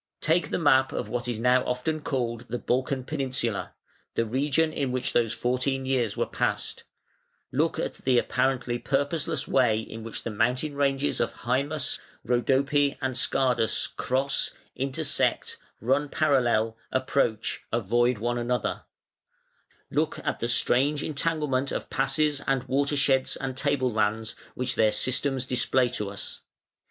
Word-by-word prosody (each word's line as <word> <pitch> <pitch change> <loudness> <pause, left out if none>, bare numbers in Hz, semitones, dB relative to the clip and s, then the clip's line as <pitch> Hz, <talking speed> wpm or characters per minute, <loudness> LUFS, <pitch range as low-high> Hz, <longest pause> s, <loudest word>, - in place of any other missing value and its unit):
Take 165 +2 +2
the - - 0
map 135 -5 +4
of - - -3
what 120 0 -3
is 120 -3 -2
now 125 +2 +4
often 155 +5 -2
called 120 -4 -2
"the 120 - -2
Balkan 130 +2 -1
peninsula", 130 -7 -2 0.4
the 115 - +1
region 145 +6 +1
in 135 -3 -1
which 130 0 -1
these 115 -2 +2
fourteen 130 +2 -1
years 125 -6 0
were - - +1
passed; - - -2 0.7
look - - +1
at - - -2
the 130 -2 +2
apparently 125 0 +1
purpose, 145 +4 0
less 155 -4 -2
way 120 -5 +3
in 110 0 -7
which 115 - -6
the 115 - -3
mountain 125 +7 0
ranges 140 0 +1
of 120 - +1
Hæmus, 140 +4 -1 0.3
Rhodope, 135 +4 +2
and 130 -2 -2
Scardus 125 -3 +2
cross, 135 +2 0 0.3
intersect, 135 0 -1 0.2
run 135 +6 +1
parallel, 120 -8 +2 0.2
approach, 130 -4 0
avoid 120 +2 +2
one 120 +3 -1
another; 125 +1 -1 1.1
look - - 0
at - - -1
the 115 - -1
strange 135 +5 +2
entanglement 150 -3 0
of - - -4
passes 145 +1 +1
and 135 -2 +1
watersheds 135 0 +2
and 135 -1 -4
table 130 -3 0
lands 110 +1 0 0.2
which 125 0 -1
their 110 -1 +3
systems 130 +1 0
display 125 0 +2
to 105 -5 -3
us. 100 - -8
130 Hz, 145 wpm, -27 LUFS, 120-140 Hz, 1.1 s, map